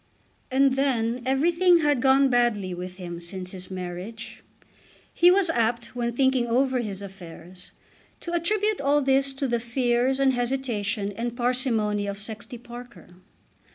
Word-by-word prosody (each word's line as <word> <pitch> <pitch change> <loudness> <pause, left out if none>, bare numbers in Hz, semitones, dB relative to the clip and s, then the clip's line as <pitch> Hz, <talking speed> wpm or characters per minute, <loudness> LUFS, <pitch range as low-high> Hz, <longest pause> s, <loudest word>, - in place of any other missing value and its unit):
And 270 +1 +3
then 250 -3 0
everything 340 +6 +4
had 290 -4 +2
gone 270 +1 +5
badly 240 -7 +1
with 180 +1 -7
him 175 -2 -7
since 180 +1 -7
his 185 -1 -9
marriage. 185 +4 -7 0.7
He 350 - +6
was 365 -2 +3
apt, 235 -2 -1
when 240 -1 -1
thinking 260 0 +2
over 255 +2 +2
his 200 -4 -5
affairs, 180 -2 -11 0.5
to 345 - -5
attribute 415 +3 +1
all 285 +1 +2
this 270 +1 +2
to 270 0 -2
the 240 -1 0
fears 245 +2 0
and 270 -1 +3
hesitation 235 -5 -2
and 235 +3 -4
parsimony 230 -5 0
of 200 0 -4
Sexty 215 +3 -7
Parker. 240 -1 -12
240 Hz, 145 wpm, -25 LUFS, 205-270 Hz, 0.7 s, He